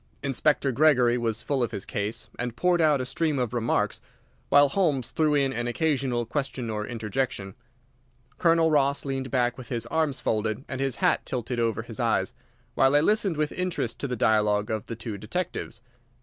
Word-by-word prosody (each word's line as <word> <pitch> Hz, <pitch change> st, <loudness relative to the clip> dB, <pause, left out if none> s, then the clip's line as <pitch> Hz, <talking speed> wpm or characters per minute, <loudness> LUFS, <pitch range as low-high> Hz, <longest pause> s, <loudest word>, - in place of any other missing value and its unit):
Inspector 140 Hz, 0 st, +1 dB
Gregory 125 Hz, -3 st, +4 dB
was 115 Hz, -1 st, -2 dB
full 140 Hz, 0 st, -1 dB
of 120 Hz, -, +1 dB
his 100 Hz, -, -6 dB
case, 105 Hz, -2 st, -3 dB
and 125 Hz, -1 st, -3 dB
poured 175 Hz, +5 st, +2 dB
out 150 Hz, -3 st, +4 dB
a 130 Hz, -, -2 dB
stream 155 Hz, +3 st, 0 dB
of 125 Hz, -3 st, -1 dB
remarks, 120 Hz, -1 st, 0 dB, 0.5 s
while 145 Hz, 0 st, +6 dB
Holmes 145 Hz, -, 0 dB
threw 155 Hz, -2 st, +2 dB
in 135 Hz, -2 st, +2 dB
an 120 Hz, 0 st, -2 dB
occasional 130 Hz, -3 st, 0 dB
question 130 Hz, -2 st, -3 dB
or 105 Hz, -1 st, -3 dB
interjection. 115 Hz, -3 st, -3 dB, 0.9 s
Colonel 165 Hz, -1 st, +4 dB
Ross 140 Hz, -1 st, +2 dB
leaned 135 Hz, -1 st, -3 dB
back 125 Hz, -1 st, 0 dB
with 125 Hz, -, -10 dB
his 120 Hz, -2 st, -2 dB
arms 155 Hz, +1 st, 0 dB
folded 110 Hz, +3 st, -1 dB
and 130 Hz, -, -4 dB
his 135 Hz, -2 st, 0 dB
hat -, -, +2 dB
tilted 125 Hz, -1 st, -3 dB
over 115 Hz, -2 st, 0 dB
his -, -, -10 dB
eyes, -, -, +1 dB, 0.4 s
while 135 Hz, +1 st, +3 dB
I -, -, +7 dB
listened 195 Hz, 0 st, +1 dB
with 150 Hz, -1 st, 0 dB
interest 170 Hz, -11 st, -2 dB
to 140 Hz, -, -2 dB
the 125 Hz, -, -2 dB
dialogue 105 Hz, -2 st, +2 dB
of 110 Hz, -1 st, -3 dB
the 115 Hz, -, -5 dB
two 110 Hz, -2 st, -6 dB
detectives. 115 Hz, -, -4 dB
130 Hz, 185 wpm, -26 LUFS, 115-145 Hz, 0.9 s, I